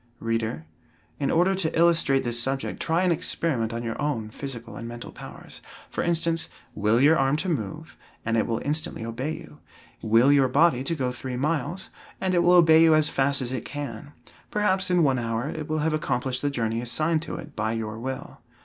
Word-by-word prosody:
Reader, 115 -8 -2 0.5
in 140 - 0
order 180 +4 +3
to 180 -5 -1
illustrate 165 -5 +4
this 120 -1 0
subject 135 +2 -2
try 165 +2 +1
an 180 - +3
experiment 145 -7 -1
on 115 +1 -4
your 115 +3 -4
own 115 -8 -2
physical 120 -4 -7
and 115 +2 -7
mental 120 0 -8
powers. - - -11 0.3
For - - -2
instance; 165 -1 0 0.2
will 105 +3 +2
your 150 +5 +6
arm 135 +1 +2
to 180 +4 -2
move, 155 - -4 0.3
and 115 0 0
it 115 - +1
will 115 -1 -1
instantly 150 -5 -2
obey 125 +7 -3
you. 75 - -11 0.4
Will 115 +5 +4
your 140 -2 +5
body 135 -1 +3
to 165 - 0
go 130 -4 -1
three 125 0 -5
miles, 160 +6 -2 0.3
and 185 -1 0
it 175 - +4
will 175 +1 +5
obey 160 -2 +7
you 160 -1 +6
as 155 -1 +3
fast 140 0 +1
as 125 - -3
it 130 -3 -3
can; 145 0 -7 0.4
perhaps 195 -3 +1
in 180 -2 +3
one 135 -3 +2
hour 115 +2 -2
it 155 -2 -6
will 155 -1 0
have 160 - +1
accomplished 130 -3 -1
the 145 - 0
journey 115 -4 -1
assigned 155 +6 +1
to 170 - -5
it 155 -4 -9
by 110 +1 -1
your 110 -1 -4
will. 130 +2 -6
140 Hz, 205 wpm, -25 LUFS, 115-160 Hz, 0.5 s, obey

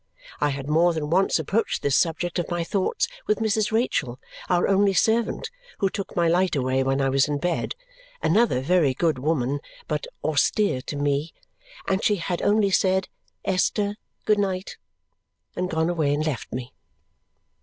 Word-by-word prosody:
I 145 - +2
had 140 -1 -4
more 165 +3 +3
than 155 -1 -3
once 190 +3 +3
approached 195 +8 -1
this 140 -1 +2
subject 170 +1 0
of 175 - -3
my 175 -1 -1
thoughts 195 - 0 0.2
with 210 - +2
Mrs. 220 -1 0
Rachael, 145 - 0 0.3
our 175 -1 +3
only 195 0 +3
servant, 225 +5 +1 0.3
who 195 -1 0
took 195 - -5
my 170 -1 +2
light 175 0 +2
away 130 -1 +1
when 135 +1 +1
I 135 - +2
was 135 +1 +3
in 145 -1 -1
bed 175 +3 -2 0.4
(another 200 - +2
very 145 -3 +2
good 160 -4 +1
woman, 140 -1 0 0.3
but 150 -1 -2 0.2
austere 155 +1 +1
to - - -4
me), 145 +2 -1 0.5
and 190 +1 0
she 210 - +3
had 175 -1 -3
only 205 -1 +3
said, 190 0 +2 0.4
"Esther, 200 +2 +1 0.3
good 210 -1 +3
night!" 190 -2 -2 0.8
and 180 0 -2
gone 160 -1 0
away 155 -5 +1
and 155 +1 -1
left 150 -6 -3
me. 125 0 -6
170 Hz, 165 wpm, -24 LUFS, 145-195 Hz, 0.8 s, more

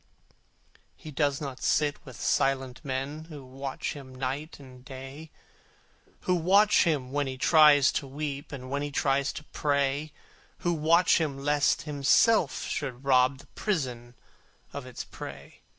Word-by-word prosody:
He 155 - -10
does 145 -1 0
not 135 -3 -6
sit 150 -1 +1
with 130 - -10
silent 135 -1 0
men 140 +3 -4
Who 150 -5 -10
watch 135 +1 -5
him 130 -3 -11
night 135 +5 -4
and 130 -2 -14
day; 135 +3 -9 0.9
Who 180 - +1
watch 195 +5 +4
him 140 -6 0
when 145 0 0
he 130 0 -5
tries 150 0 +6
to 140 - -3
weep, 145 +1 -5
And 130 -2 -8
when 140 +1 -1
he 145 - -3
tries 140 -1 +1
to - - -8
pray; 145 0 -1 0.5
Who 175 - +3
watch 165 +3 +4
him 145 -4 -2
lest 145 +1 +1
himself 150 - +3
should 130 -3 -4
rob 130 0 +4
The - - -16
prison 125 - -3 0.6
of 140 -3 -6
its 125 - -7
prey. - - -10
140 Hz, 150 wpm, -28 LUFS, 130-150 Hz, 0.9 s, tries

